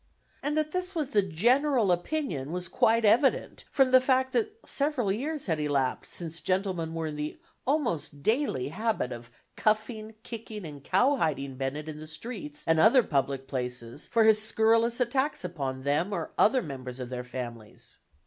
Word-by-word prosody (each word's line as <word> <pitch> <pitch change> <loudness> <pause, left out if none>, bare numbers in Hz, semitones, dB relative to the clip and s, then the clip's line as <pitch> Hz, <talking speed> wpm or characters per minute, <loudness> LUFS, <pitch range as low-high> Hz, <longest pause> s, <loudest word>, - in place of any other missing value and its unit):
And 295 +2 -1
that 305 0 0
this 365 +1 -3
was 305 -5 -1
the 210 - +3
general 235 - +2
opinion 175 - -1
was 180 0 -3
quite 225 +5 +3
evident 245 +6 +3
from 265 -2 +3
the 255 0 +7
fact 260 0 +2
that 430 -1 0
several 275 -8 0
years 285 +8 -2
had 160 -4 0
elapsed 140 -4 -1
since 165 -2 -6
gentlemen 185 -4 -1
were 165 -1 -2
in 150 -1 -4
the 150 +1 -4 0.3
almost 205 - -1
daily 220 - +1
habit 190 - -1
of 120 0 -8 0.3
cuffing, 215 0 0
kicking 220 -4 -7
and 145 -3 -9
cowhiding 155 - +1
Bennett 135 +3 -3
in 155 -1 -6
the 155 - -9
streets 155 -2 -7
and 160 -1 +3
other 235 +8 +6
public 135 -3 -1
places 125 0 -5
for 230 -1 +3
his 220 -1 +5
scurrilous 225 +2 +2
attacks 265 +2 0
upon 135 -7 -4
them, 150 +8 +1
or 170 -4 -3
upon 250 +3 +4
members 130 -3 -7
of 125 -1 -5
their 125 -1 -4
families. 120 -4 -8
190 Hz, 170 wpm, -28 LUFS, -, 0.3 s, the